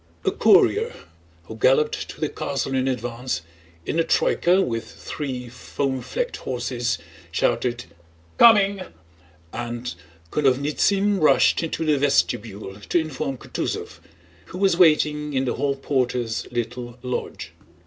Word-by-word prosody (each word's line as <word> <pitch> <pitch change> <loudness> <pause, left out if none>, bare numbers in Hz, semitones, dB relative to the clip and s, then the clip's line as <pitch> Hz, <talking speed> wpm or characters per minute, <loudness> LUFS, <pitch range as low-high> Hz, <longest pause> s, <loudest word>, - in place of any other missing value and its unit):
A - - +3
courier - - +4 0.5
who 110 - -9
galloped 135 +6 +2
to - - -10
the 155 - 0
castle 135 -1 -3
in 130 0 +1
advance, 120 -5 -3 0.4
in 165 - -1
a - - +4
troyka 180 +3 +2
with 115 -1 -4
three 130 -4 -5
foam 130 +2 -3
flecked - - -3
horses, 120 -2 -2 0.3
shouted 120 +5 0 0.6
"Coming!" 200 -4 +6 0.7
and 120 -2 -4 0.4
Konovnítsyn 150 +9 +2
rushed 155 - +4
into 165 0 -2
the 150 -2 +2
vestibule 110 -8 0
to 105 - -1
inform 140 -4 -3
Kutúzov, - - -4 0.5
who - - -9
was 190 -2 +3
waiting 150 -3 +3
in 135 0 +1
the 125 - 0
hall 140 0 0
porter's 125 -4 -1
little 120 0 -4
lodge. 125 -1 -4
130 Hz, 125 wpm, -23 LUFS, 120-150 Hz, 0.7 s, Coming